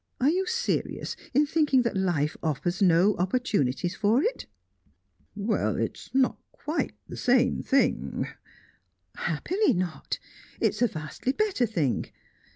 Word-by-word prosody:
Are 270 Hz, +4 st, +4 dB
you 370 Hz, +2 st, 0 dB
serious 470 Hz, +3 st, -1 dB, 0.2 s
in 290 Hz, +3 st, +4 dB
thinking 290 Hz, -4 st, +3 dB
that 235 Hz, -, -1 dB
life 175 Hz, -6 st, +1 dB
offers 175 Hz, +4 st, -1 dB
no 185 Hz, +2 st, +5 dB
opportunities 180 Hz, -, 0 dB
for 220 Hz, +7 st, +3 dB
it?" 480 Hz, -, -2 dB, 0.9 s
"Well 210 Hz, +2 st, 0 dB
it's -, -, -3 dB
not 265 Hz, -1 st, +2 dB
quite 310 Hz, +3 st, -3 dB
the -, -, -7 dB
same 250 Hz, 0 st, +2 dB
thing 275 Hz, -, +1 dB, 0.5 s
" -, -, -42 dB
"Happily, 405 Hz, +4 st, +1 dB
not! 180 Hz, -3 st, -2 dB, 0.4 s
It's 210 Hz, -, +1 dB
a 245 Hz, -, +5 dB
vastly 155 Hz, -, -3 dB
better 390 Hz, -, +1 dB
thing. 160 Hz, -, 0 dB
230 Hz, 130 wpm, -27 LUFS, 175-280 Hz, 0.9 s, no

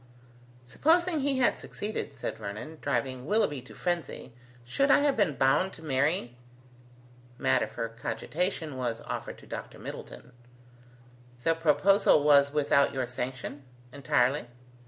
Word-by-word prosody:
"Supposing 325 Hz, -, +2 dB
he 275 Hz, -1 st, +1 dB
had 250 Hz, -, +2 dB
succeeded," 210 Hz, +1 st, -5 dB
said -, -, -5 dB
Vernon, 110 Hz, +11 st, -7 dB
driving 130 Hz, -2 st, -2 dB
Willoughby 160 Hz, -, +1 dB
to 125 Hz, -, -14 dB
frenzy, 170 Hz, -8 st, -3 dB, 0.3 s
"should 275 Hz, -, +1 dB
I 280 Hz, -, +6 dB
have 285 Hz, -2 st, +2 dB
been 195 Hz, -10 st, +1 dB
bound 150 Hz, +9 st, +2 dB
to 160 Hz, -, -13 dB
marry?" 140 Hz, -2 st, 0 dB, 1.0 s
Matter 130 Hz, -1 st, +2 dB
for 115 Hz, -, -4 dB
cogitation 150 Hz, -, -3 dB
was 120 Hz, -3 st, -2 dB
offered -, -, -5 dB
to -, -, -16 dB
Dr. -, -, -7 dB
Middleton. -, -, -9 dB, 1.1 s
"The 165 Hz, -, +3 dB
proposal 165 Hz, +1 st, +4 dB
was 140 Hz, -1 st, +5 dB
without 140 Hz, -1 st, +2 dB
your 130 Hz, -1 st, 0 dB
sanction?" 125 Hz, +3 st, -5 dB, 0.3 s
"Entirely." 130 Hz, -1 st, +1 dB
145 Hz, 130 wpm, -29 LUFS, 130-185 Hz, 1.1 s, I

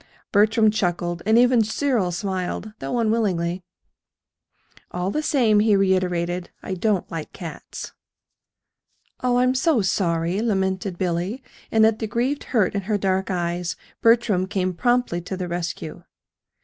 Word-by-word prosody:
Bertram 220 Hz, +1 st, +4 dB
chuckled, 175 Hz, -4 st, -1 dB
and 220 Hz, +1 st, +5 dB
even 245 Hz, -1 st, +5 dB
Cyril 220 Hz, -4 st, 0 dB
smiled 190 Hz, +3 st, -3 dB
though 245 Hz, -, -3 dB
unwillingly. 195 Hz, -6 st, 0 dB, 1.3 s
"All 180 Hz, +2 st, -2 dB
the 305 Hz, -, -1 dB
same," 235 Hz, -9 st, +3 dB
he 210 Hz, -1 st, +4 dB
reiterated, 180 Hz, -2 st, 0 dB
"I 190 Hz, -, -4 dB
don't 195 Hz, 0 st, 0 dB
like 165 Hz, -2 st, -6 dB
cats." 170 Hz, -3 st, -8 dB, 1.3 s
"Oh, 250 Hz, -1 st, +2 dB
I'm 255 Hz, +1 st, +3 dB
so 270 Hz, -, +2 dB
sorry," 175 Hz, 0 st, 0 dB
lamented 190 Hz, -4 st, -1 dB
Billy; 185 Hz, +8 st, -2 dB, 0.3 s
and 220 Hz, -1 st, +5 dB
at 220 Hz, -1 st, +2 dB
the 220 Hz, -, -2 dB
grieved 250 Hz, +7 st, -1 dB
hurt 215 Hz, -7 st, +1 dB
in 200 Hz, -, -1 dB
her 210 Hz, -, +2 dB
dark 190 Hz, -1 st, 0 dB
eyes 175 Hz, -1 st, -2 dB, 0.3 s
Bertram 230 Hz, -5 st, +3 dB
came 185 Hz, -2 st, -1 dB
promptly 240 Hz, -3 st, +1 dB
to 185 Hz, +2 st, -5 dB
the 180 Hz, -1 st, -3 dB
rescue. 170 Hz, -2 st, -4 dB
195 Hz, 135 wpm, -23 LUFS, 180-225 Hz, 1.3 s, and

